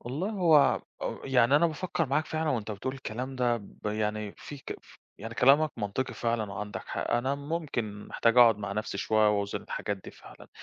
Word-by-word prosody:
والله 150 Hz, -, -3 dB
هو 165 Hz, -8 st, +5 dB, 0.3 s
أ -, -, -2 dB
يعني 130 Hz, 0 st, +4 dB
أنا 170 Hz, -, +4 dB
بافكّر 165 Hz, 0 st, -2 dB
معاك 150 Hz, +4 st, 0 dB
فعلًا 160 Hz, 0 st, -1 dB
وأنت 110 Hz, -5 st, -2 dB
بتقول 130 Hz, +6 st, -4 dB
الكلام 130 Hz, +1 st, -5 dB
ده 120 Hz, -1 st, +2 dB
ب 105 Hz, 0 st, -11 dB
يعني 105 Hz, -1 st, -2 dB
في 145 Hz, -, -9 dB
ك -, -, -7 dB
ف -, -, -19 dB, 0.2 s
يعني 115 Hz, +2 st, -7 dB
كلامك 145 Hz, +5 st, +5 dB
منطقي 110 Hz, +4 st, -2 dB
فعلًا 115 Hz, -3 st, -1 dB
وعَندك 105 Hz, 0 st, -5 dB
حق، -, -, -3 dB
أنا 130 Hz, +3 st, +1 dB
ممكن 140 Hz, -9 st, -4 dB
محتاج 115 Hz, +1 st, +2 dB
أقعُد 115 Hz, -3 st, +7 dB
مع 100 Hz, -1 st, -4 dB
نَفسي 105 Hz, +2 st, -3 dB
شوية 110 Hz, -1 st, +3 dB
وأوزِن 100 Hz, -1 st, -1 dB
الحاجات 100 Hz, -, -3 dB
دي -, -, -8 dB
فعلًا، -, -, -15 dB
120 Hz, 190 wpm, -29 LUFS, 105-145 Hz, 0.3 s, أقعُد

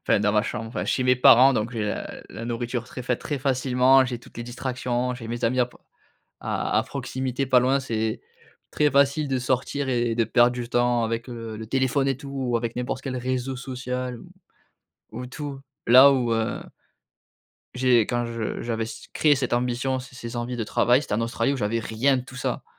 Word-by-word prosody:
enfin -, -, +3 dB
dans 105 Hz, 0 st, +2 dB
ma 105 Hz, 0 st, +3 dB
chambre 110 Hz, +1 st, -4 dB
enfin 115 Hz, -, -4 dB
chez 130 Hz, -, 0 dB
mes 125 Hz, 0 st, +3 dB
parents, 130 Hz, +2 st, +7 dB
donc 115 Hz, +1 st, -1 dB
j'ai 115 Hz, -3 st, -2 dB
la 105 Hz, -, -3 dB, 0.2 s
la 115 Hz, -, -7 dB
nourriture 120 Hz, 0 st, -3 dB
très 125 Hz, +1 st, -8 dB
fa 125 Hz, 0 st, 0 dB
très 145 Hz, +3 st, -4 dB
facilement, 130 Hz, 0 st, +3 dB
j'ai 125 Hz, -2 st, -4 dB
toutes 120 Hz, -, -17 dB
les 120 Hz, -, -4 dB
distractions, 125 Hz, 0 st, -2 dB
j'ai 115 Hz, -2 st, -8 dB
mes 120 Hz, +1 st, -3 dB
amis 125 Hz, +3 st, +2 dB
à 125 Hz, -, +3 dB
pr 125 Hz, -, -19 dB, 0.6 s
à -, -, -1 dB
à -, -, +2 dB
proximité, 130 Hz, 0 st, -3 dB
pas 130 Hz, -1 st, +4 dB
loin, 135 Hz, +2 st, +2 dB
c'est, 110 Hz, -3 st, -2 dB, 0.5 s
très 150 Hz, -1 st, +2 dB
facile 140 Hz, +2 st, +3 dB
de 135 Hz, -1 st, 0 dB
sortir 130 Hz, +2 st, -1 dB
et 120 Hz, -2 st, +1 dB
de 115 Hz, -1 st, +2 dB
perdre 120 Hz, +2 st, +4 dB
du 120 Hz, -1 st, -5 dB
temps 120 Hz, -1 st, +2 dB
avec 115 Hz, +2 st, -3 dB
le 115 Hz, -2 st, -6 dB
le 110 Hz, -, -7 dB
téléphone 135 Hz, +3 st, +1 dB
et 135 Hz, -, 0 dB
tout 140 Hz, 0 st, -10 dB
ou 130 Hz, -3 st, -1 dB
avec 115 Hz, 0 st, -3 dB
n'importe 125 Hz, +1 st, -3 dB
quel 130 Hz, -2 st, -4 dB
réseau 130 Hz, +1 st, -2 dB
social 125 Hz, -1 st, -4 dB
ou -, -, -13 dB, 0.9 s
ou 125 Hz, +3 st, -5 dB
tout. 140 Hz, +1 st, -6 dB, 0.3 s
Là, 130 Hz, +4 st, +9 dB
où, 125 Hz, -4 st, +1 dB
heu 115 Hz, 0 st, -1 dB, 1.1 s
J'ai 125 Hz, -1 st, +4 dB
quand 120 Hz, +2 st, -1 dB
je 115 Hz, -1 st, -4 dB
j'avais 115 Hz, -1 st, -2 dB
s 110 Hz, -, -9 dB
créé 150 Hz, -3 st, +3 dB
cette 130 Hz, -2 st, -2 dB
ambition, 125 Hz, +2 st, 0 dB
ces 130 Hz, 0 st, -12 dB
ces 120 Hz, -1 st, -7 dB
envies 120 Hz, +1 st, -3 dB
de 115 Hz, -, -2 dB
travail, 120 Hz, +5 st, +3 dB
c'était 105 Hz, -, -3 dB
en 110 Hz, -, 0 dB
Australie 115 Hz, +2 st, 0 dB
où 140 Hz, -, -2 dB
j'avais 110 Hz, 0 st, -1 dB
rien 115 Hz, +5 st, +1 dB
de 125 Hz, -, -4 dB
tout 130 Hz, -, -13 dB
ça. 125 Hz, -, -3 dB
125 Hz, 215 wpm, -25 LUFS, 115-130 Hz, 1.1 s, Là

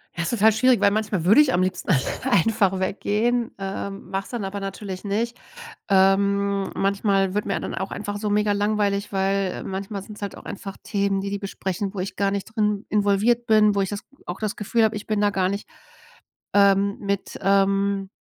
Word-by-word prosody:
Ja, 165 Hz, -, -2 dB
ist 170 Hz, -, -1 dB
total 220 Hz, -2 st, +4 dB
schwierig, 250 Hz, +2 st, +3 dB
weil 200 Hz, -, +4 dB
manchmal 205 Hz, -5 st, -1 dB
würde 210 Hz, +10 st, +7 dB
ich 280 Hz, -4 st, +2 dB
am 180 Hz, -, +3 dB
liebsten 185 Hz, -, -3 dB, 0.4 s
einfach 195 Hz, 0 st, +2 dB
weggehen, 220 Hz, +5 st, 0 dB
ähm, 195 Hz, 0 st, -6 dB
mache 195 Hz, 0 st, -2 dB
es -, -, -13 dB
dann 235 Hz, -5 st, -4 dB
aber 200 Hz, +1 st, -4 dB
natürlich 195 Hz, -1 st, -6 dB
nicht. 225 Hz, +4 st, -1 dB, 0.5 s
Ähm, 200 Hz, 0 st, +2 dB
manchmal 195 Hz, -1 st, +1 dB
wird 210 Hz, -, 0 dB
mir 195 Hz, -, -1 dB
dann -, -, -5 dB
auch 190 Hz, +2 st, -4 dB
einfach 205 Hz, 0 st, -4 dB
so 210 Hz, 0 st, -2 dB
mega-langweilig, 205 Hz, -1 st, +1 dB
weil, 195 Hz, 0 st, +1 dB
äh, -, -, -6 dB
manchmal 195 Hz, +1 st, -5 dB
sind 210 Hz, +2 st, -10 dB
es 210 Hz, -, -9 dB
halt 200 Hz, -, -4 dB
auch -, -, -13 dB
einfach 195 Hz, -1 st, -7 dB
Themen, 200 Hz, -1 st, 0 dB
die 200 Hz, -, -3 dB
die 200 Hz, -, -2 dB
besprechen, 195 Hz, 0 st, -4 dB
wo 195 Hz, -, -5 dB
ich 190 Hz, -, -4 dB
gar 200 Hz, -1 st, +1 dB
nicht 200 Hz, -1 st, -2 dB
drin 210 Hz, -1 st, 0 dB
involviert 210 Hz, +3 st, +2 dB
bin, 215 Hz, -2 st, +4 dB
wo 200 Hz, -, +2 dB
ich 195 Hz, -, -1 dB
das 205 Hz, -1 st, -4 dB, 0.3 s
auch 175 Hz, +2 st, -6 dB
das 215 Hz, -1 st, -2 dB
Gefühl 225 Hz, +2 st, +1 dB
habe, 220 Hz, 0 st, +2 dB
ich 205 Hz, -, -6 dB
bin 215 Hz, -1 st, 0 dB
da 205 Hz, -, +4 dB
gar 190 Hz, -2 st, 0 dB
nicht, 200 Hz, +1 st, -5 dB, 0.8 s
ähm, 200 Hz, 0 st, +4 dB
mit, 200 Hz, -1 st, -3 dB
ähm 195 Hz, 0 st, +2 dB
200 Hz, 205 wpm, -23 LUFS, 195-210 Hz, 0.8 s, würde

